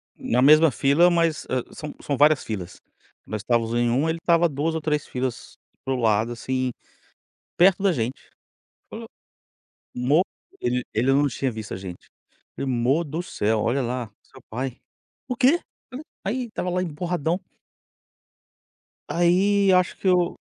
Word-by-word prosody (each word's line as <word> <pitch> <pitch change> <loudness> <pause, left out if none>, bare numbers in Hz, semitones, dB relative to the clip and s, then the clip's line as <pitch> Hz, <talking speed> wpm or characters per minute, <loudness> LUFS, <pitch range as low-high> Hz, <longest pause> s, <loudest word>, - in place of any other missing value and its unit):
Na 125 +2 0
mesma 155 +2 +7
fila, 145 +8 +4
mas, 165 -2 +1
ah, 130 -2 0
são 150 -1 -7
são 140 -3 -2
várias 150 -1 +4
filas. 95 -5 -6 0.4
Nós 110 - -5
estávamos 115 +1 0
em 120 0 +2
uma, 140 +7 +1
ele 165 +1 -2
estava 170 0 +4
2 150 +3 -1
ou 160 - -2
3 150 -1 -1
filas 125 -1 -5 0.3
para 135 - -1
o - - -1
lado, 110 0 +2
assim, 130 +1 -2 0.9
perto 190 +2 +5
da 195 - +4
gente. 125 -3 -4 0.6
O - - -7 0.9
mo 135 +7 +3 0.4
ele 125 0 0
ele 115 +4 +1
não 145 +1 +3
tinha 135 -2 -2
visto 110 -1 -7
a - - -4
gente. 95 -2 -9 0.5
Falei: 135 - -3
"Amor 130 +7 +1
do 155 +3 -4
céu, 110 - -1
olha 130 +5 +1
lá, 120 -2 -3
seu - - -17
pai". 130 +2 -4 0.5
"O 250 - -2
quê?" 275 +7 +4 0.7
Aí 245 +6 -1
estava 215 -5 -4
lá 180 +1 0
emburradão 170 0 -2 1.7
Aí 190 +3 +3
acho 180 -1 +2
que - - -3
o 180 -1 +2
140 Hz, 155 wpm, -24 LUFS, 120-170 Hz, 1.7 s, mesma